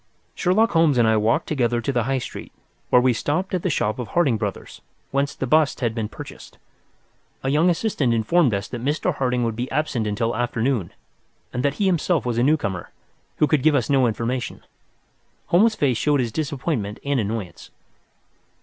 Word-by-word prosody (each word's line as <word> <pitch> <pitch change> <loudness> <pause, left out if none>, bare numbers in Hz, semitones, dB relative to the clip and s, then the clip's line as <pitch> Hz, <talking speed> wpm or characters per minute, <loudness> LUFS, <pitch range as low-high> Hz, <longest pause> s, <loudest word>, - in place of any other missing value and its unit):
Sherlock 205 +5 +2
Holmes 165 -5 +3
and 115 -2 +4
I 110 - +4
walked 110 +8 +1
together 120 -5 0
to 140 - -2
the 120 -3 0
High 135 +1 0
Street, 125 - -7 0.4
where 125 - +6
we 130 -1 +4
stopped 175 - -2
at 185 - 0
the 185 - -1
shop 110 -7 -1
of 125 - -4
Harding 160 -9 +2
Brothers, 105 -2 -5 0.3
whence 140 +1 0
the - - -3
bust 155 +2 +2
had 115 -3 0
been 110 -2 -3
purchased. - - -11 0.9
A 135 - 0
young 155 +6 +3
assistant 170 - 0
informed 120 +6 +3
us 100 -1 -2
that 120 - -6
Mr. 150 +5 0
Harding 125 -3 0
would 115 -2 -1
be 125 +3 -3
absent 130 -8 -1
until 115 +2 -1
afternoon, 120 -4 -1 0.6
and 125 - -1
that 140 +1 0
he 205 - -2
was 195 - +4
himself 170 -4 +1
a 120 -1 0
newcomer, 120 - 0 0.5
who - - +3
could 150 -2 +1
give 155 +1 +4
us 135 0 0
no 135 -3 +4
information. 120 +2 -3 0.9
Holmes's 215 +6 +4
face 130 -5 +1
showed 145 +2 +2
his 120 -3 -1
disappointment 135 -7 -3
and 140 -2 +1
annoyance. 105 -5 -4
130 Hz, 185 wpm, -22 LUFS, 115-150 Hz, 0.9 s, where